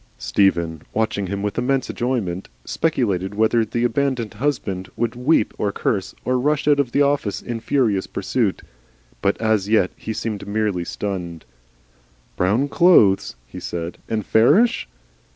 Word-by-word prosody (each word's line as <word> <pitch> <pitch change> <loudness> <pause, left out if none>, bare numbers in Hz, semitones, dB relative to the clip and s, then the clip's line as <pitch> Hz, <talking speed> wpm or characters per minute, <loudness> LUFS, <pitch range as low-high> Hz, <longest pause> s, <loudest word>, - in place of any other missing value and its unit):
Stephen, 85 -5 +1
watching 110 -3 0
him 100 +2 -3
with 105 +3 -2
immense 130 +1 0
enjoyment, 110 -8 -2 0.2
speculated 100 - -1
whether 110 +2 +3
this 120 +2 -1
abandoned 125 -2 -1
husband 100 -10 -2
would 120 0 -1
weep 125 -1 +2
or 100 - 0
curse, 100 -1 -2
or 130 0 +1
rush 150 +3 0
off 145 -1 +4
at 130 -4 -1 0.3
once 100 - -3
in 120 -1 -5
furious 110 -5 +1
pursuit. - - -1 0.6
But 100 0 +1
as 110 -3 +1
yet 105 -5 +3
he - - -6
seemed 105 -3 -4
merely 100 -4 -1
stunned. 90 -5 -5 0.9
"Brown 105 +10 +1
clothes?" 140 - +4
he - - -9
said. 85 0 -5
"And 110 -3 -1
fairish?" 120 - +3
110 Hz, 140 wpm, -21 LUFS, 95-125 Hz, 0.9 s, off